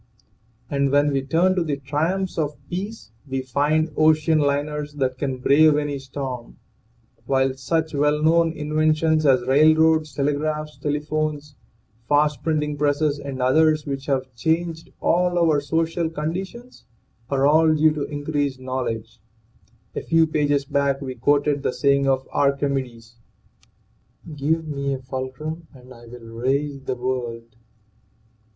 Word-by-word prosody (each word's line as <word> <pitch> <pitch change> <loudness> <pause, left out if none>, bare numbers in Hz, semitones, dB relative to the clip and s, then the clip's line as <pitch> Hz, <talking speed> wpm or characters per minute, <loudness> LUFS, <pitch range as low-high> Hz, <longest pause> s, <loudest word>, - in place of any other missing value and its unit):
And 140 -1 0
when 145 +1 +3
we 135 -1 0
turn 165 +7 +2
to 180 - +1
the 150 -4 -2
triumphs 160 +8 -2
of 150 -1 -2
peace 200 - -5 0.2
we 135 0 -3
find 150 +5 +1
ocean 155 0 +3
liners 145 +1 -1
that 130 -2 -1
can 135 -3 -2
brave 145 +4 +4
any 145 -2 -2
storm; 130 -3 -7 0.7
while 135 -1 +2
such 155 +5 -2
well 150 +1 +2
known 165 +1 +4
inven 155 0 +1
tions 155 -1 +2
as 130 -2 +3
railroads, 155 +2 +4
telegraphs, 150 +2 -2
telephones, 150 0 -2 0.6
fast 150 0 +2
printing 150 -2 -1
presses 145 0 +1
and 135 -3 -4
others 155 +3 +3
which 135 -1 -5
have 130 -2 -1
changed 165 +5 -2
all 175 +1 +2
our 160 -4 +3
social 165 +3 -1
con 160 0 -3
ditions, 235 +7 -8 0.4
are 140 -1 +1
all 155 +2 +5
due 155 0 +3
to 150 - -4
increased 145 -2 -2
knowledge. 130 -5 -4 0.8
A - - -2
few 165 -1 +3
pages 145 -2 0
back 140 0 0
we 130 -2 -5
quoted 145 +3 +1
the - - 0
saying 140 -1 +2
of 130 -1 +1
Archimedes: 135 -5 -1 1.2
"Give 160 +3 -1
me 140 -2 -2
a - - -7
fulcrum 130 +5 -6
and 130 0 -14
I 120 -1 -15
will 120 0 -11
raise 135 +5 -2
the 130 - -3
world." 120 -2 -4
145 Hz, 140 wpm, -22 LUFS, 135-155 Hz, 1.2 s, all